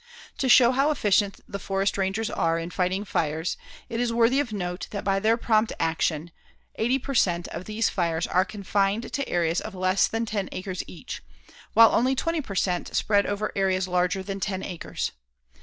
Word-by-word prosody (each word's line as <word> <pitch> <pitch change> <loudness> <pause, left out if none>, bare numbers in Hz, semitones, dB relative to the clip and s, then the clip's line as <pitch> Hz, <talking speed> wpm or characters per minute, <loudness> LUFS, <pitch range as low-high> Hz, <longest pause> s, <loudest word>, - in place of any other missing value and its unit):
To 265 - +1
show 240 0 +7
how 275 +3 +2
efficient 205 -7 +1
the 200 - -5
forest 195 +1 0
rangers 200 +3 -1
are 165 0 +1
in 165 +1 -4
fighting 185 +3 -1
fires, 160 -2 -1 0.3
it 230 - -4
is 240 -1 +1
worthy 235 +3 +3
of 285 -6 -1
note 180 -2 -4
that 200 - -5
by 195 -1 +1
their 220 +3 +3
prompt 220 -2 +2
actions, 160 0 0 0.5
80 240 +4 +2
per 275 +1 -5
cent. 175 -7 +2
of 175 +2 -6
these 220 +1 0
fires 170 -2 0
are 185 - +2
confined 200 +2 -1
to 280 -1 -2
areas 170 -1 +1
of - - -7
less 185 +1 +2
than 225 +1 -2
ten 205 -3 -3
acres 185 -1 -4
each, 160 -6 -8 0.5
while 230 +1 +8
only 260 +3 +3
20 330 +3 -1
per 200 -8 -8
cent. 180 -1 -1
spread 205 -1 +2
over 205 +1 -2
areas 190 -1 +1
larger 180 +1 0
than 195 0 -5
ten 190 -1 -2
acres. 175 -3 -4
195 Hz, 190 wpm, -26 LUFS, 180-225 Hz, 0.5 s, while